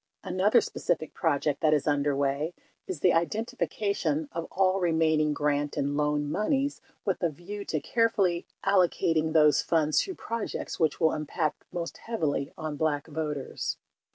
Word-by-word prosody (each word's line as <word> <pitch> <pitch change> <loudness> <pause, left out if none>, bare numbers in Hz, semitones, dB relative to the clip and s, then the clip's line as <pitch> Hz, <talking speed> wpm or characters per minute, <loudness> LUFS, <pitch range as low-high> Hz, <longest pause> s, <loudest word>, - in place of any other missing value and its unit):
Another 190 +6 +3
specific 155 - -2
project 150 -2 0
that 155 -1 +4
is 145 - -1
underway 145 +2 +1 0.3
is 180 -6 -5
the 180 - +5
identification 190 - -1
of 165 0 -4
all 190 0 +2
remaining 160 -3 +2
grant 145 0 0
and 140 +1 0
loan 150 0 +1
moneys 275 - 0 0.2
with 195 -3 0
a 170 - +2
view 185 +7 -7
to 155 - -1
carefully 200 -5 +1 0.2
allocating 170 -4 +2
those 150 -3 +5
funds 155 -2 +2
to 380 - -5
projects 230 -1 -4
which 160 -3 +1
will 160 -2 +4
impact 155 +1 -2
most 170 -1 -4
heavily 155 -12 -2
on 155 -3 -4
black 150 -2 0
voters. 150 -3 -3
160 Hz, 145 wpm, -28 LUFS, 150-185 Hz, 0.3 s, the